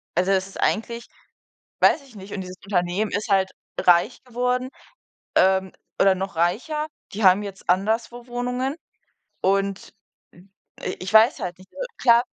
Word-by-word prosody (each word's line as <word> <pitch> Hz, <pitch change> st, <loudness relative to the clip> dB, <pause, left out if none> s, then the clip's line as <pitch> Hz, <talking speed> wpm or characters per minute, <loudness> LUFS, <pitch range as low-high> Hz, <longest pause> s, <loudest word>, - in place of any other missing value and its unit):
also, 185 Hz, +2 st, +2 dB
das 190 Hz, 0 st, +2 dB
ist 195 Hz, -, -11 dB
eigentlich 235 Hz, +2 st, 0 dB, 0.8 s
weiß 310 Hz, -, +5 dB
ich 235 Hz, -, -18 dB
nicht, 195 Hz, 0 st, -9 dB
und 195 Hz, -, -3 dB
dieses 185 Hz, 0 st, -8 dB
Unternehmen 190 Hz, +1 st, 0 dB
ist 210 Hz, +1 st, -2 dB
halt 190 Hz, -1 st, +3 dB, 0.3 s
reich 175 Hz, +7 st, +3 dB
geworden, 250 Hz, +1 st, -1 dB, 0.7 s
ähm, 190 Hz, 0 st, +3 dB, 0.3 s
oder 195 Hz, -1 st, +6 dB
noch 190 Hz, -2 st, -4 dB
reicher. 250 Hz, -, 0 dB, 0.3 s
Die 210 Hz, +1 st, -2 dB
haben 190 Hz, +2 st, +6 dB
jetzt 195 Hz, -3 st, -9 dB
anderswo 225 Hz, +6 st, 0 dB
Wohnungen 250 Hz, +3 st, -2 dB, 0.7 s
und, 195 Hz, +1 st, 0 dB, 0.4 s
hm, 185 Hz, +3 st, -19 dB, 0.3 s
i -, -, -3 dB
ich 185 Hz, +3 st, -5 dB
weiß 220 Hz, +3 st, +6 dB
halt 180 Hz, 0 st, -4 dB
nicht. 185 Hz, -, -17 dB
Äh, -, -, -4 dB, 0.2 s
klar 235 Hz, -1 st, +6 dB
200 Hz, 155 wpm, -24 LUFS, 190-235 Hz, 0.8 s, oder